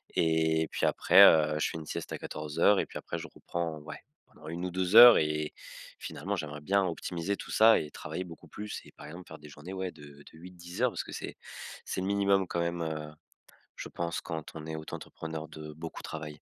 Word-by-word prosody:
et 80 -1 +2
puis - - 0
après, - - +6
heu, 75 -1 +6
je - - +1
fais - - -5
une 80 - -8
sieste - - -5
à - - -3
14:00 75 +7 +1
et - - 0
puis - - -8
après - - -5
je - - -7
reprends, 85 -2 -4
ouais, 75 +1 -9 0.3
pendant 75 - -15
1 85 +2 -4
ou 90 - -3
2 95 +3 -1
heures 120 +1 +12
et 75 0 -1 0.5
finalement 100 +7 -4
j'aimerais 75 -2 -5
bien 100 +5 +2
optimiser 90 +2 -3
tout - - -8
ça 110 +1 +6
et 75 - -6
travailler 80 +4 -5
beaucoup 85 -2 -12
plus 105 0 -6
et - - -15
par 75 - -12
exemple 85 +4 -10
faire 80 - -10
des 75 0 -12
journées, 75 +6 -10
ouais, 95 -1 -3
de 75 -3 -15 0.3
de 80 - -16
8-10 90 +3 -9
heures, 125 - +4
parce 90 - -4
que - - -10
c'est - - -6 0.5
c'est 95 - -3
le 95 - -2
minimum 100 -1 +2
quand 85 - -2
même, 85 0 -2
heu, 75 -1 -4 0.6
je - - -7
pense, 85 -1 -3
quand 80 -2 -6
on 80 0 -7
est 80 - -4
auto-entrepreneur, 80 0 -7
de 75 -1 -9
beaucoup 80 +1 -8
travailler. 75 -2 -7
80 Hz, 220 wpm, -30 LUFS, 75-90 Hz, 0.6 s, heures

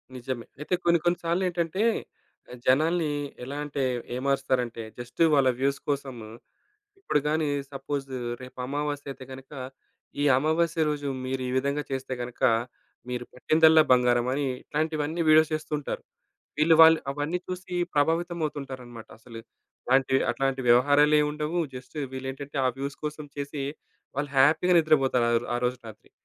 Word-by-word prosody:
నిజమే. 125 -1 -5 0.2
అయితే 150 - -3
కొన్ని 170 -1 +4
కొన్ని 175 0 +3
సార్లేంటంటే, 175 +2 0 0.7
ఆ - - -8
జనాల్ని 155 +4 +3 0.3
ఎలా 140 +3 -6
అంటే, 140 -2 -3 0.3
ఏ - - -2
మారుస్తారంటే, 130 -4 0 0.2
జస్ట్ 120 +6 -7
వాళ్ళ 135 -2 +5
వ్యూస్ 140 +1 +1
కోసం 140 -2 -2 0.9
ఇప్పుడు 150 - +1
గాని 155 0 +1 0.3
సపోజ్ 135 0 -4 0.3
రేపు 130 0 -11
అమావాస్య 145 +1 -3
అయితే 130 - -12
గనక, 135 0 -11 0.7
"ఈ - - +2
అమావాస్య 160 +3 +1
రోజు 145 -1 -3 0.2
మీరీ 130 0 -2
విధంగా 140 +2 0
చేస్తే 130 -1 -3
గనక 120 0 -8 0.7
మీరు 125 -1 -3
పట్టిందల్లా 160 +4 +5
బంగారం" 125 -1 +3
అని 140 +2 0 0.2
ఇట్లాంటివన్నీ 155 +1 -2
వీడియోస్ 155 0 +6
చేస్తుంటారు. 150 -2 -4 0.6
వీళ్ళు 160 +2 +5
వాళ్ళు 160 0 +8
అవన్నీ 145 +5 -2
చూసి 185 0 -6 0.2
ప్రభావితం 165 +4 +1
అవుతుంటారన్నమాట. 130 -6 -7
అసలు 115 0 -11 0.5
అలాంటి 130 +1 +3 0.2
అట్లాంటి 135 -1 -1
వ్యవహారాలేముండవు. 150 +5 +4 0.2
జస్ట్ 125 +4 -10 0.2
వీళ్ళేంటంటే 135 +2 -6
ఆ - - +4
వ్యూస్ 140 +1 -4
కోసం 150 0 -4
చేసి, 140 0 -4 0.5
వాళ్ళు 140 0 -2
హ్యాపీ‌గా 160 +6 +5
నిద్రపోతారు 135 -6 +3 0.3
ఆరోజు 125 +1 -1
రాత్రి. 110 - -13
145 Hz, 130 wpm, -27 LUFS, 130-155 Hz, 0.9 s, వాళ్ళు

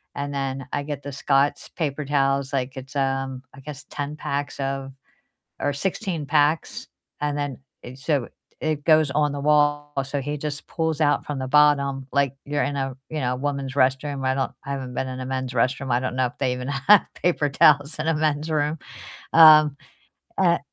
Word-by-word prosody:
and 140 0 -4
then 135 -1 -3
I 145 - -1
get 145 -1 -5
the 140 - -6
Scott's 140 +1 +1
paper 150 -3 -3
towels. 135 -1 +1
Like, 130 0 -2
it's, 135 +2 -9
um, 135 -1 -1
I - - -13
guess 145 0 -9
10 145 0 -4
packs 145 -1 -4
of 135 0 -3 0.7
or 145 - 0
16 175 0 -3
packs, 150 +2 +1 0.3
and 145 0 -1
then 145 -3 -3 0.2
it 125 +1 -9
So 145 -4 0 0.3
it 155 -2 -1
goes 155 -3 +4
on 150 0 +1
the 145 - -4
wall, 145 0 +2
so 140 +2 -3
he 145 +2 -3
just 145 0 -5
pulls 160 -2 -2
out 145 -1 +2
from 145 -2 -4
the 130 - -3
bottom, 140 -2 +3
like 140 -1 +1
you're 145 0 -1
in 145 - -2
a, 135 -2 -3
you 155 - -3
know 125 0 0
a - - -2
woman's 140 -1 -3
restroom. 135 +1 +1
I 130 - +2
don't 135 -1 -1
I 140 - -5
haven't 130 -2 -4
been 130 - -2
in 130 0 -5
a - - -4
men's 130 -1 -3
restroom. 130 +2 0
I 120 +1 +2
don't 130 -1 -3
know 130 - +3
if - - -14
they 130 -2 +1
even 125 +1 -5
have 145 +9 +5
paper 175 -4 +1
towels 145 +2 +4
in 155 - -2
a 165 - +3
men's 155 0 0
room. 150 +1 0 0.6
Um, 155 -3 +8 0.6
uh - - +3
140 Hz, 200 wpm, -24 LUFS, 135-150 Hz, 0.7 s, Um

